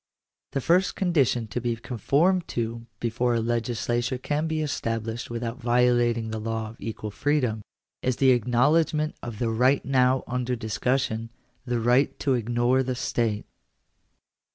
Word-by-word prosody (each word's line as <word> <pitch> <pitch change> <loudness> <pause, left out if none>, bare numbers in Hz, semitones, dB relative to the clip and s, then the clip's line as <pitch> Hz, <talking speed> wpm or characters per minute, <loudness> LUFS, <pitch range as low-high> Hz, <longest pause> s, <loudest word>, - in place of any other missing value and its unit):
The 135 - 0
first 180 +7 +2
condition 140 - +2
to 120 +3 -3
be 120 -1 -1
conformed 140 - +1
to 115 0 -3
before 120 +1 0
a - - +2
legislature 120 +2 -1
can 145 +5 -1
be 160 -1 -1
established 115 -4 -3
without 120 +2 -4
violating 120 -1 +2
the 110 - -3
law 110 0 -3
of 115 - -16
equal 110 -1 -5
freedom, 125 -4 0 0.4
is 130 -1 0
the 135 +1 +4
acknowledgment 150 +6 +2
of 120 -3 -6
the 115 0 0
right 125 +5 +2
now 130 -1 +3
under 125 0 -2
discussion 115 0 -1 0.2
— 125 0 -42
the 120 -1 0
right 125 +4 +2
to 135 - +1
ignore 120 +2 +2
the 130 -1 -2
state 115 -3 -1
*. - - -47
120 Hz, 155 wpm, -26 LUFS, 115-130 Hz, 0.4 s, the